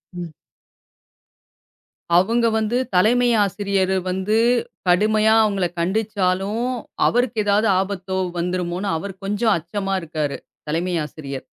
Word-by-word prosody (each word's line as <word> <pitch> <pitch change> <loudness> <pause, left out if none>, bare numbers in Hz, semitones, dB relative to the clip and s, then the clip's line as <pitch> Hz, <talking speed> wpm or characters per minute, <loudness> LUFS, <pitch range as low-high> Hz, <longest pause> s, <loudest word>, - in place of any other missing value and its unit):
ம். 175 -2 -6 1.9
அவங்க 230 +6 +2
வந்து, 220 +2 0 0.2
தலைமை 240 +7 +4 0.2
ஆசிரியர் 195 -1 0
வந்து 190 +4 0 0.5
கடுமையா 215 +4 +4
அவங்கள 200 -3 +1
கண்டிச்சாலும், 200 +2 0 0.4
அவருக்கு 245 -1 +1
ஏதாவது 205 +2 +3
ஆபத்தோ 190 -1 -3 0.2
வந்துருமோன்னு 180 +2 -2
அவர் 195 +4 -6
கொஞ்சம் 210 +3 +1
அச்சமா 195 +4 -4
இருக்காரு. 155 -3 -3 0.3
தலைமை 170 +4 -1
ஆசிரியர். 140 -3 -8
195 Hz, 100 wpm, -21 LUFS, 180-215 Hz, 1.9 s, தலைமை